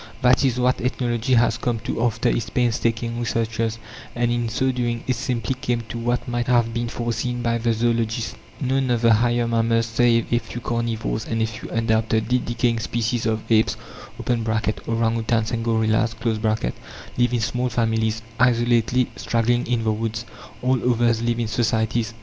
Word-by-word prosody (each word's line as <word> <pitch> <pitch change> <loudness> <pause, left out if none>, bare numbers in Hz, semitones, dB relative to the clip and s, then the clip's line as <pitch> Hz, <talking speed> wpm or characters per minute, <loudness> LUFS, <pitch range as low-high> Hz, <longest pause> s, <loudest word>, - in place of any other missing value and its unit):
That 125 +1 +5
is 125 -2 +1
what 125 +1 +2
ethnology 125 0 0
has 120 +1 +3
come 120 -2 -1
to 115 - -3
after 115 -1 +1
its 115 - 0
painstaking 115 -1 0
researches. 115 -1 -1 0.4
And 120 0 +1
in 120 -1 0
so 130 +3 +1
doing 120 -2 -2
it 130 - 0
simply 125 0 -2
came 120 -2 -2
to 120 - -4
what 120 +1 -1
might 120 -1 -2
have 120 -2 +2
been 120 0 -1
foreseen 120 +1 -2
by 115 -1 +1
the 115 0 +1
zoologist. 115 0 0 0.2
None 135 -1 0
of 120 -2 +1
the 115 -1 +6
higher 120 +1 +2
mammals, 115 0 +2
save 115 0 +2
a 120 - +4
few 120 - -8
carnivores 115 -2 -2
and 115 - -1
a 110 - +2
few 110 +1 -7
undoubtedly 110 +2 +1
decaying 120 -1 0
species 115 0 -1
of 110 -1 -1
apes 110 0 +3 0.4
(orang 120 -2 -1
outans 115 +1 0
and 115 -1 -2
gorillas), 110 0 +1 0.3
live 110 - -2
in 120 - +2
small 125 +3 -1
families, 110 -1 0 0.2
isolatedly 120 0 +3
straggling 120 +1 0
in 120 -1 0
the 110 - +2
woods. 115 +1 -3 0.4
All 130 -1 +2
others 115 -1 +2
live 120 0 0
in 115 - 0
societies. 115 0 0
115 Hz, 165 wpm, -23 LUFS, 115-120 Hz, 0.4 s, the